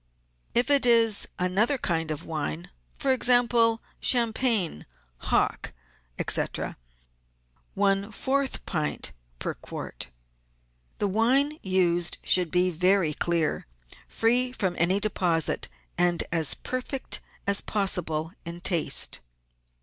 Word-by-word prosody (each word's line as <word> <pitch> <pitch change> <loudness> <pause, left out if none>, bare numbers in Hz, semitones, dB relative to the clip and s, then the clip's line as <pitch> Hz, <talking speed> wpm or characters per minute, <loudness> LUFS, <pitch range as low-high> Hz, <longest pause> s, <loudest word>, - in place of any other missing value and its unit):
If 245 +4 +3
it 280 -1 +4
is 230 -3 +5
another 195 +10 +1
kind 165 -8 -1
of 155 +1 -5
wine, 90 - -4 0.2
for 270 - 0
example, 240 -2 +3 0.2
champagne, 230 - +1 0.3
hock, - - -1 0.5
&c., - - +4 1.3
one 200 +1 0
fourth 270 +5 -2
pint 155 -4 -2 0.3
per - - -4
quart. - - -8 0.9
The 205 - -1
wine 265 - +2
used 175 -2 0
should 180 -2 +2
be 180 +2 +1
very 180 -1 +1
clear, 165 - -1 0.4
free 245 +3 +1
from 190 -8 -2
any 185 +4 +2
deposit, 180 -6 0 0.3
and 175 -1 +2
as 165 -3 +4
perfect 255 +1 -3 0.3
as 200 0 +4
possible 170 -6 -1
in 170 0 -7
taste. 175 -3 +2
195 Hz, 105 wpm, -26 LUFS, 170-235 Hz, 1.3 s, is